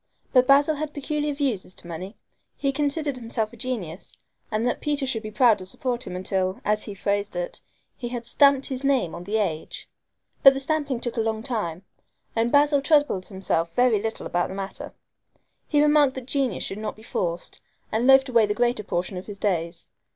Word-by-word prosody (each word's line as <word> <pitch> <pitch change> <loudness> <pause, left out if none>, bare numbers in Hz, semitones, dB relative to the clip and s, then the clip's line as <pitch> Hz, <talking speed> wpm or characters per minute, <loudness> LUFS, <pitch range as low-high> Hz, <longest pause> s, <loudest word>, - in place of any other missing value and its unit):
But 255 -1 +5
Basil 290 +2 +5
had 300 0 -4
peculiar 295 +1 -1
views 265 -9 -1
as 185 - -13
to - - -11
money. 180 +5 -7 0.4
He 275 - 0
considered 290 0 -1
himself 230 -2 -3
a - - -10
genius, 210 -8 -5 0.3
and 215 +2 -1
that 245 - -1
Peter 290 -2 0
should 245 -4 -1
be 215 - -6
proud 220 -1 +4
to 185 - -7
support 245 +4 -3
him 180 - -5
until, 185 +1 -1
as 210 0 +1
he 205 - -7
phrased 200 +1 -1
it, - - -4 0.4
he 240 - -4
had 240 -1 -5
"stamped 275 +2 +4
his 265 -1 -4
name 265 -11 +1
on 175 +1 -7
the 210 +3 0
age"! 165 -7 -3 0.5
But 270 -1 +8
the - - -2
stamping 285 -3 -1
took 240 -1 -3
a - - +3
long 220 0 -2
time, 205 -9 -3 0.5
and 230 +1 +1
Basil 290 0 +4
troubled 290 - +2
himself 170 -4 -2
very 245 -4 +3
little 220 +1 -4
about 175 0 0
the 190 - -6
matter. 195 0 -6 0.7
He 295 -1 +3
remarked 295 -3 +4
that 260 -2 -6
genius 270 -4 -1
should 195 - -4
not 215 - -4
be 220 - -16
forced, 170 -5 -3 0.3
and 230 +3 +1
loafed 270 0 +7
away 230 -4 +4
the 205 - -1
greater 240 -2 +1
portion 185 0 -2
of 180 - -7
his 205 -2 -7
days. 170 -4 -2
235 Hz, 200 wpm, -25 LUFS, 195-275 Hz, 0.7 s, But